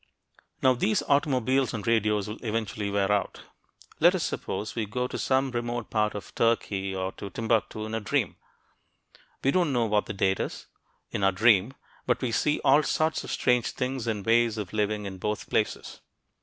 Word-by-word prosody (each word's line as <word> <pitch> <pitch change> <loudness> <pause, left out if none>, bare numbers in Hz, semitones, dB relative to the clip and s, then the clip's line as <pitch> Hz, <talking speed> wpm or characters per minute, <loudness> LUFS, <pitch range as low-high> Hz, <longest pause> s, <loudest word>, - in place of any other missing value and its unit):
Now 130 -1 +6
these 195 - +1
automobiles 135 -2 +1
and 105 - -5
radios 105 -3 +2
will 105 +4 -7
eventually 105 -2 -2
wear 100 0 +1
out. 100 -2 -1 0.6
Let - - +6
us - - -1
suppose 105 - -3
we 115 -2 -2
could - - -19
go 125 0 0
to - - -5
some 135 0 +1
remote 120 -1 -3
part 105 -1 +1
of 105 - -8
Turkey 100 -4 0
or 95 0 -2
to 100 - -8
Timbuktu 110 0 -1
in 110 - -6
a 110 - 0
dream. 105 - -1 1.1
We 135 - +3
don't 175 -3 +2
know 120 -3 +2
what 105 -1 +1
the - - -4
date 95 -1 +1
is, - - -4 0.5
in - - -2
our 95 - +5
dream, 110 +3 +4 0.3
but - - +2
we 125 -3 -2
see 150 +6 +1
all 140 +2 +6
sorts 155 +1 0
of - - -8
strange 125 -2 +1
things 130 -2 -3
and 105 -3 -2
ways 115 0 +3
of 105 -3 -5
living 105 -1 -1
in 95 -1 -6
both 105 +3 -3
places. - - -1
110 Hz, 190 wpm, -27 LUFS, 105-125 Hz, 1.1 s, Now